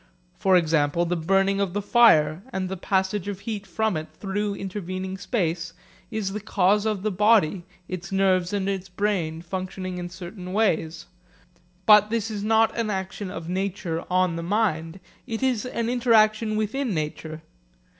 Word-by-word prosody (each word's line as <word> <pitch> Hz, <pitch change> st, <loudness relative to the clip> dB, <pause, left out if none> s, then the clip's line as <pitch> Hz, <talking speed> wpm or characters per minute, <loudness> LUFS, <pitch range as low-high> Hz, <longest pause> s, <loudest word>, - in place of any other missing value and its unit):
For 190 Hz, -1 st, +4 dB
example, 160 Hz, 0 st, +2 dB
the 175 Hz, +1 st, -1 dB
burning 195 Hz, +4 st, +2 dB
of 190 Hz, -3 st, -1 dB
the 205 Hz, -, 0 dB
fire 170 Hz, -9 st, +5 dB
and 190 Hz, -3 st, -2 dB
the 190 Hz, -, -3 dB
passage 190 Hz, +1 st, -1 dB
of 200 Hz, -1 st, -5 dB
heat 210 Hz, -3 st, -5 dB
from 220 Hz, +2 st, 0 dB
it 155 Hz, 0 st, -4 dB
through 205 Hz, +1 st, -2 dB
intervening 190 Hz, -1 st, -5 dB
space 175 Hz, -7 st, -2 dB, 0.4 s
is 215 Hz, -4 st, -3 dB
the 210 Hz, -, -3 dB
cause 205 Hz, 0 st, +2 dB
of 210 Hz, -3 st, -1 dB
the 215 Hz, -, 0 dB
body, 195 Hz, -3 st, +3 dB, 0.2 s
its 175 Hz, -1 st, -6 dB
nerves 185 Hz, -2 st, +2 dB
and 200 Hz, -2 st, -1 dB
its 195 Hz, -1 st, -3 dB
brain, 180 Hz, -4 st, -1 dB
functioning 185 Hz, 0 st, -5 dB
in 175 Hz, 0 st, -5 dB
certain 180 Hz, +1 st, -8 dB
ways. 170 Hz, -6 st, 0 dB, 0.8 s
But 210 Hz, -1 st, +7 dB
this 225 Hz, -1 st, -1 dB
is 205 Hz, -1 st, -4 dB
not 220 Hz, +1 st, +3 dB
an 230 Hz, -2 st, -1 dB
action 190 Hz, 0 st, -4 dB
of 165 Hz, -3 st, -7 dB
nature 180 Hz, -2 st, -2 dB
on 180 Hz, -2 st, +2 dB
the -, -, -3 dB
mind. 175 Hz, -3 st, -1 dB, 0.3 s
It 225 Hz, +2 st, -3 dB
is 250 Hz, -3 st, +1 dB
an 235 Hz, -2 st, -2 dB
interaction 225 Hz, -3 st, +3 dB
within 215 Hz, +1 st, -1 dB
nature. 155 Hz, +1 st, -4 dB
195 Hz, 165 wpm, -25 LUFS, 175-210 Hz, 0.8 s, But